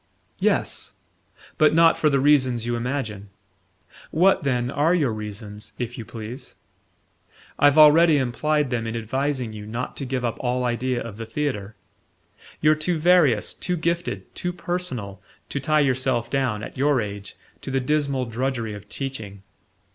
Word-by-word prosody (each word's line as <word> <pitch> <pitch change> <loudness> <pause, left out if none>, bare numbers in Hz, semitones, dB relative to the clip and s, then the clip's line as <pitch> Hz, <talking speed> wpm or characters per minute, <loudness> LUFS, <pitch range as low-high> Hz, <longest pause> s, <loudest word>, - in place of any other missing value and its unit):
"Yes; - - 0 0.7
but 155 0 +5
not 165 0 +6
for 155 - +2
the 140 -1 +2
reasons 130 -5 +3
you 120 0 -1
imagine." 115 -5 -3 0.8
"What, 185 +5 +3
then, 125 -4 0
are 155 +5 +2
your 140 -10 +1
reasons, 105 0 -7
if 120 -1 -4
you 115 - -7
please?" 115 +3 -8 1.0
"I've 145 +1 +5
already 155 +1 +7
implied 145 +2 0
them 115 -2 -1
in 115 - -4
advising 130 +1 -2
you 105 -1 -8
not 120 +4 -4
to 140 - -4
give 130 -1 -2
up 115 - -2
all 125 0 -1
idea 125 +1 -1
of 110 -3 -8
the 115 -1 -6
theatre. 110 -5 -3 0.9
You're 155 0 +5
too 155 +3 -1
various, 155 -9 +4
too 180 -1 -2
gifted, 170 +1 -2
too 180 - -3
personal, 170 - -4 0.3
to 140 - -2
tie 155 +3 +2
yourself 130 -3 0
down, 125 -6 0
at - - -8
your 140 -1 +3
age, 100 -2 -5 0.3
to - - -6
the 135 0 +1
dismal 140 -1 0
drudgery 115 -1 -2
of 105 0 -10
teaching." 110 -8 -6
130 Hz, 155 wpm, -24 LUFS, 115-150 Hz, 1.0 s, already